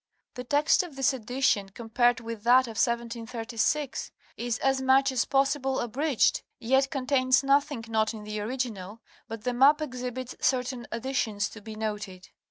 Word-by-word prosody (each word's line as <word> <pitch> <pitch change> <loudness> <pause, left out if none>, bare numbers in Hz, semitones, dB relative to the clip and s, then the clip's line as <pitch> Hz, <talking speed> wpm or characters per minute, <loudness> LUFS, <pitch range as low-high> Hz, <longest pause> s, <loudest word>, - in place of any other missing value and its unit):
The 250 - -6
text 290 +4 +3
of 350 -6 -9
this 270 0 +2
edition, 245 -4 0
compared 240 +3 +1
with 230 -2 -6
that 245 +3 +6
of 225 -3 -8
1736, 235 +3 -2 0.2
is 240 0 -2
as 270 0 +1
much 265 +1 +4
as 255 -3 +1
possible 270 -1 +1
abridged, 265 +3 +1 0.2
yet 265 +3 +2
contains 260 -1 +2
nothing 275 -3 +1
not 220 -1 +1
in 220 -2 -9
the 210 0 -5
original, 220 -3 -4 0.3
but 225 -1 -7
the 250 - -1
map 275 +5 +5
exhibits 255 -3 -5
certain 250 -1 -1
additions 225 -4 -1
to 220 - -12
be 220 +1 -9
noted. 210 -4 -5
245 Hz, 155 wpm, -27 LUFS, 225-270 Hz, 0.3 s, that